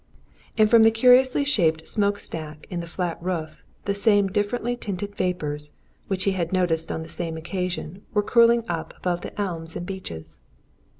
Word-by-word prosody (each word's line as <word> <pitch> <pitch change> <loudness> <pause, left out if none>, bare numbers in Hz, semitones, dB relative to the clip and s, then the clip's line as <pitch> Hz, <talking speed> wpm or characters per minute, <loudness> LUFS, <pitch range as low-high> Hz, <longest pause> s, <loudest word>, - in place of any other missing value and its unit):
And 215 -1 +6
from 230 +1 +6
the 225 - +8
curiously 250 +4 +5
shaped 160 - +1
smoke 205 -1 +2
stack 155 -5 -7
in 175 - -2
the 170 - -5
flat 175 -1 -3
roof, 165 -3 -4 0.2
the 200 - +1
same 205 -1 +3
differently 220 +5 -1
tinted 205 -3 -5
vapours 150 -6 -2 0.3
which 190 -1 0
he 195 - +2
had 175 -3 -2
noticed 175 -3 +1
on 160 - -3
the - - -10
same 165 -1 -3
occasion 180 +1 -4
were 210 -1 +2
curling 235 +1 +5
up 165 -2 -4
above 175 -1 -1
the - - -8
elms 165 -5 -2
and 175 - -4
beeches. 80 - -6
185 Hz, 175 wpm, -24 LUFS, 165-205 Hz, 0.3 s, the